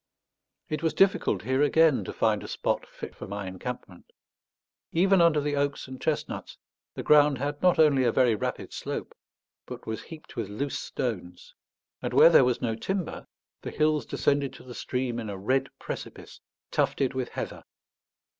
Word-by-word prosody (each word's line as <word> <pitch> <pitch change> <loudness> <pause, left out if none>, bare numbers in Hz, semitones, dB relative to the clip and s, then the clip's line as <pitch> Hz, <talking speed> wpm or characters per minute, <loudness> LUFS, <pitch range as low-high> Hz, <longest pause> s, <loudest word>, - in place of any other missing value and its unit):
It 155 -1 -3
was 165 -1 0
difficult 195 0 +3
here 130 +2 +1
again 150 0 +4
to - - -4
find 110 -2 +1
a - - -7
spot - - -1
fit - - -9
for - - -8
my 100 0 -5
encampment. 95 0 -7 0.8
Even 190 +2 +4
under 165 -3 +5
the 145 0 -1
oaks 140 -1 -1
and 130 0 -9
chestnuts 155 -2 -3 0.4
the - - -4
ground 150 -2 +5
had 145 +3 -3
not 180 -1 +4
only 145 -4 +5
a 120 - +3
very 125 -2 +4
rapid 105 - -4
slope, - - -5 0.5
but - - -8
was 110 0 -4
heaped 160 -2 -12
with 110 -4 -3
loose 135 +7 -3
stones; 90 -7 -5 0.5
and - - -3
where 170 - +8
there 135 - +7
was 125 -1 0
no 115 -2 +1
timber 185 - -4 0.3
the - - -5
hills 155 -4 +1
descended 140 -1 0
to - - -12
the 125 - -10
stream 125 -1 -2
in 110 -2 -5
a 100 - -5
red 130 +8 0
precipice - - -8 0.3
tufted 135 -2 +1
with 130 -2 -3
heather. - - -6
135 Hz, 175 wpm, -27 LUFS, 115-150 Hz, 0.8 s, where